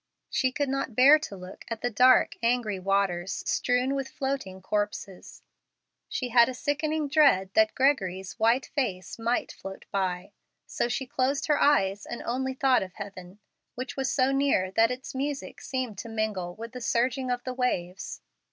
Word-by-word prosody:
She 260 Hz, -2 st, +1 dB
could 285 Hz, +2 st, -1 dB
not 270 Hz, -3 st, -2 dB
bear 280 Hz, +5 st, +7 dB
to 205 Hz, -10 st, -7 dB
look 185 Hz, +1 st, -10 dB
at 230 Hz, -1 st, -5 dB
the 245 Hz, -, -1 dB
dark, 250 Hz, +5 st, +5 dB
angry 230 Hz, -4 st, 0 dB
waters 195 Hz, -1 st, 0 dB
strewn 250 Hz, +2 st, +1 dB
with 275 Hz, -1 st, -2 dB
floating 265 Hz, -10 st, -4 dB
corpses. 205 Hz, -1 st, -4 dB, 0.7 s
She 250 Hz, -, -3 dB
had 235 Hz, +1 st, +6 dB
a 255 Hz, -, -5 dB
sickening 300 Hz, +3 st, -1 dB
dread 275 Hz, -11 st, +4 dB
that 330 Hz, 0 st, +3 dB
Gregory's 195 Hz, -9 st, 0 dB
white 230 Hz, +4 st, +3 dB
face 215 Hz, -9 st, -3 dB
might 235 Hz, +2 st, 0 dB
float 195 Hz, 0 st, -9 dB
by. 190 Hz, 0 st, -2 dB, 0.3 s
So -, -, -1 dB
she 245 Hz, +2 st, -2 dB
closed 260 Hz, +2 st, 0 dB
her 295 Hz, -2 st, +2 dB
eyes, 205 Hz, -9 st, +2 dB
and 240 Hz, -, -6 dB
only 260 Hz, +2 st, -2 dB
thought 265 Hz, -1 st, +3 dB
of 185 Hz, -1 st, -6 dB
heaven, 190 Hz, -2 st, -9 dB, 0.4 s
which 255 Hz, +1 st, -5 dB
was 265 Hz, -1 st, -1 dB
so 265 Hz, -1 st, +2 dB
near 270 Hz, -9 st, +2 dB
that 225 Hz, +3 st, +4 dB
its 250 Hz, +1 st, -6 dB
music 275 Hz, +1 st, -4 dB
seemed 255 Hz, -6 st, -4 dB
to 230 Hz, -, -6 dB
mingle 210 Hz, -5 st, -2 dB
with 230 Hz, +1 st, -8 dB
the 250 Hz, 0 st, -8 dB
surging 255 Hz, +3 st, 0 dB
of 245 Hz, 0 st, -1 dB
the 255 Hz, -, -4 dB
waves. 195 Hz, -8 st, -2 dB
245 Hz, 170 wpm, -27 LUFS, 195-265 Hz, 0.7 s, bear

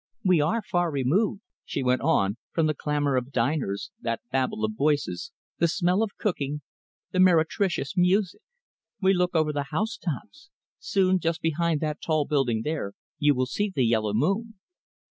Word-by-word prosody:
"We 180 Hz, -5 st, +4 dB
are 215 Hz, +10 st, +1 dB
far 175 Hz, -3 st, 0 dB
removed," 165 Hz, -, +1 dB, 0.2 s
she -, -, -3 dB
went 125 Hz, 0 st, +2 dB
on, 105 Hz, -9 st, +2 dB, 0.2 s
"from 165 Hz, -, +2 dB
the 155 Hz, -, +2 dB
clamour 145 Hz, -1 st, 0 dB
of 125 Hz, +2 st, -3 dB
diners, 125 Hz, -5 st, -1 dB
that 115 Hz, 0 st, -2 dB
babel 130 Hz, -5 st, 0 dB
of 110 Hz, -, -2 dB
voices, 150 Hz, -, 0 dB, 0.3 s
the 170 Hz, -, +4 dB
smell 180 Hz, +3 st, +1 dB
of 220 Hz, -3 st, -2 dB
cooking, 150 Hz, -7 st, -2 dB, 0.5 s
the 185 Hz, -, -1 dB
meretricious 175 Hz, -3 st, +2 dB
music. 185 Hz, -, +2 dB, 0.6 s
We 190 Hz, -1 st, +4 dB
look 180 Hz, -1 st, 0 dB
over 155 Hz, -1 st, +2 dB
the 145 Hz, -1 st, -2 dB
house 215 Hz, +9 st, -1 dB
tops. 195 Hz, -, -6 dB, 0.3 s
Soon, 185 Hz, -1 st, +2 dB
just 165 Hz, -1 st, -1 dB
behind 165 Hz, -1 st, +1 dB
that 155 Hz, -1 st, -2 dB
tall 155 Hz, -2 st, +1 dB
building 125 Hz, -7 st, +1 dB
there, 150 Hz, -10 st, -3 dB, 0.3 s
you 145 Hz, -2 st, +4 dB
will 130 Hz, 0 st, +1 dB
see 205 Hz, +10 st, -2 dB
the 130 Hz, -, +3 dB
yellow 110 Hz, -2 st, +1 dB
moon." 210 Hz, -, 0 dB
155 Hz, 165 wpm, -26 LUFS, 135-185 Hz, 0.6 s, We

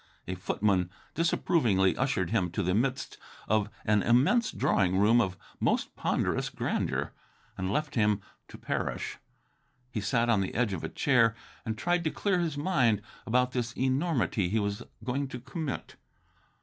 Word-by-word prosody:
A 90 Hz, -, -2 dB
footman 90 Hz, 0 st, 0 dB, 0.2 s
disapprovingly 120 Hz, -, +2 dB
ushered 125 Hz, -10 st, 0 dB
him 95 Hz, -6 st, +1 dB
to 105 Hz, -, 0 dB
the 90 Hz, +1 st, +1 dB
midst 130 Hz, +6 st, -1 dB, 0.3 s
of 110 Hz, -1 st, +2 dB, 0.2 s
an 105 Hz, -1 st, +3 dB
immense 140 Hz, -, +3 dB
drawing 95 Hz, -1 st, +2 dB
room 110 Hz, +4 st, +5 dB
of 95 Hz, -4 st, -2 dB, 0.2 s
most -, -, 0 dB
ponderous -, -, 0 dB
grandeur, -, -, -2 dB, 0.4 s
and 95 Hz, +1 st, -2 dB
left 150 Hz, +5 st, -1 dB
him 105 Hz, -3 st, +2 dB, 0.3 s
to -, -, -11 dB
perish. -, -, -3 dB, 0.7 s
He 110 Hz, -, -2 dB
sat 115 Hz, +4 st, +1 dB
on 115 Hz, -4 st, +3 dB
the 95 Hz, -, -3 dB
edge 115 Hz, -3 st, +1 dB
of 90 Hz, -, -4 dB
a -, -, -3 dB
chair 115 Hz, -5 st, +3 dB, 0.3 s
and 110 Hz, -1 st, -2 dB
tried 175 Hz, +6 st, +1 dB
to -, -, +3 dB
clear 190 Hz, +2 st, 0 dB
his 165 Hz, -4 st, -1 dB
mind 125 Hz, -, +2 dB, 0.2 s
about 125 Hz, +2 st, +2 dB
this 120 Hz, -2 st, -2 dB
enormity 130 Hz, -, +1 dB
he 110 Hz, -, +1 dB
was 100 Hz, -1 st, -2 dB, 0.2 s
going 135 Hz, +3 st, -1 dB
to 125 Hz, -1 st, -7 dB
commit. 135 Hz, +3 st, -5 dB
115 Hz, 160 wpm, -29 LUFS, 100-135 Hz, 0.7 s, room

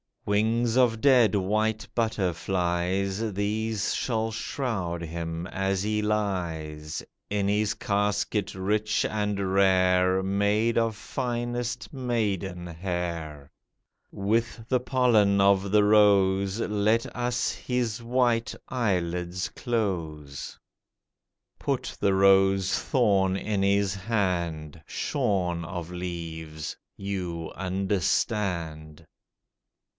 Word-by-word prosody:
Wings 110 Hz, +3 st, +1 dB
of 115 Hz, -3 st, +3 dB
dead 125 Hz, -7 st, +5 dB
white 110 Hz, +3 st, 0 dB
butterflies, 95 Hz, 0 st, 0 dB
These 105 Hz, +2 st, -1 dB
shall 110 Hz, -2 st, -1 dB
shroud 110 Hz, -7 st, -3 dB
him, 85 Hz, 0 st, -4 dB
as 95 Hz, 0 st, -1 dB
he 105 Hz, 0 st, 0 dB
lies 85 Hz, -8 st, -2 dB, 0.3 s
In 100 Hz, -1 st, 0 dB
his 105 Hz, +1 st, +1 dB
casket 100 Hz, -1 st, -1 dB
rich 105 Hz, +3 st, 0 dB
and 105 Hz, -3 st, -1 dB
rare, 95 Hz, -1 st, +4 dB
Made 100 Hz, +4 st, +1 dB
of 115 Hz, -1 st, +1 dB
finest 120 Hz, 0 st, -3 dB
maiden 100 Hz, -9 st, -2 dB
hair. 85 Hz, -4 st, -4 dB, 0.6 s
With 115 Hz, +3 st, -1 dB
the 130 Hz, -, +3 dB
pollen 120 Hz, -6 st, +3 dB
of 100 Hz, 0 st, +4 dB
the 105 Hz, +1 st, +4 dB
rose 100 Hz, -1 st, +4 dB
Let 105 Hz, +1 st, +1 dB
us 120 Hz, 0 st, 0 dB
his 125 Hz, -2 st, -2 dB
white 120 Hz, -1 st, +1 dB
eyelids 90 Hz, -6 st, -1 dB
close. 80 Hz, -, -3 dB, 1.0 s
Put -, -, -2 dB
the 100 Hz, -, +2 dB
rose 95 Hz, 0 st, +4 dB
thorn 100 Hz, -7 st, +2 dB
in 100 Hz, 0 st, -1 dB
his 100 Hz, -1 st, +2 dB
hand, 90 Hz, -7 st, -2 dB
Shorn 90 Hz, -4 st, -1 dB
of 90 Hz, 0 st, -6 dB
leaves—you 85 Hz, +1 st, -5 dB
understand. 90 Hz, -4 st, -1 dB
100 Hz, 90 wpm, -27 LUFS, 90-110 Hz, 1.0 s, dead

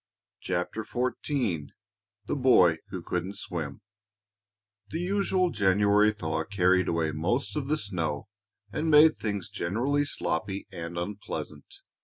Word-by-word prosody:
CHAPTER 95 Hz, +5 st, -2 dB
XIV 120 Hz, -, -1 dB, 0.6 s
THE -, -, -1 dB
BOY 90 Hz, -, +5 dB
WHO 95 Hz, -3 st, -6 dB
COULDN'T 90 Hz, +3 st, -3 dB
SWIM 80 Hz, -3 st, -5 dB, 1.1 s
The 165 Hz, -, -3 dB
usual 185 Hz, 0 st, +1 dB
January 105 Hz, +1 st, +4 dB
thaw 80 Hz, -6 st, -2 dB
carried 90 Hz, 0 st, +2 dB
away 80 Hz, -2 st, 0 dB
most 95 Hz, -, -1 dB
of 145 Hz, -3 st, -2 dB
the 155 Hz, +2 st, +1 dB
snow 85 Hz, -, -2 dB, 0.4 s
and 155 Hz, +6 st, -1 dB
made 155 Hz, +1 st, +8 dB
things 100 Hz, -4 st, -3 dB
generally 130 Hz, +11 st, 0 dB
sloppy 95 Hz, -5 st, -2 dB
and 85 Hz, -1 st, -6 dB
unpleasant. 100 Hz, +4 st, -6 dB
100 Hz, 120 wpm, -28 LUFS, 85-130 Hz, 1.1 s, made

